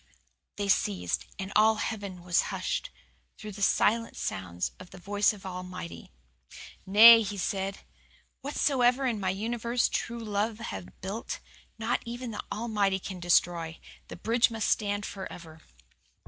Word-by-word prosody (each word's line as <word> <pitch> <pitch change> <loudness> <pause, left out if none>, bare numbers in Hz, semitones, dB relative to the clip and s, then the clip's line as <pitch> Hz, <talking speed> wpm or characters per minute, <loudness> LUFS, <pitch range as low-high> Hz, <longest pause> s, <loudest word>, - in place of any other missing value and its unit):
"They 205 -1 -2
ceased 90 - 0
and 195 0 -5
all 220 +1 +6
heaven 200 -5 -4
was 175 -1 +3
hushed. - - -2 0.5
Through 215 -1 -8
the 200 +1 -9
silence 230 +3 +2
sounded 90 -2 -3 0.2
the - - -12
voice 205 +3 +2
of 205 -2 -11
the 190 - -5
Almighty. 180 -1 -7 0.8
"'Nay,' 225 +4 +10
He 205 -1 -4
said, 195 0 -2 0.6
'whatsoever 265 -2 +2
in 235 -4 0
my 190 -2 0
universe 235 +5 0
true 235 - -3
love 215 0 -1
hath 95 - -6
builded 195 +5 -4 0.4
not 225 +2 0
even 240 0 -5
the 215 - -5
Almighty 210 -3 0
can 190 -1 -7
destroy. 170 -1 +2 0.3
The - - -8
bridge 230 +7 +2
must 225 -2 -1
stand 205 -1 0
forever. 170 -5 -8
205 Hz, 140 wpm, -29 LUFS, 185-230 Hz, 0.8 s, Nay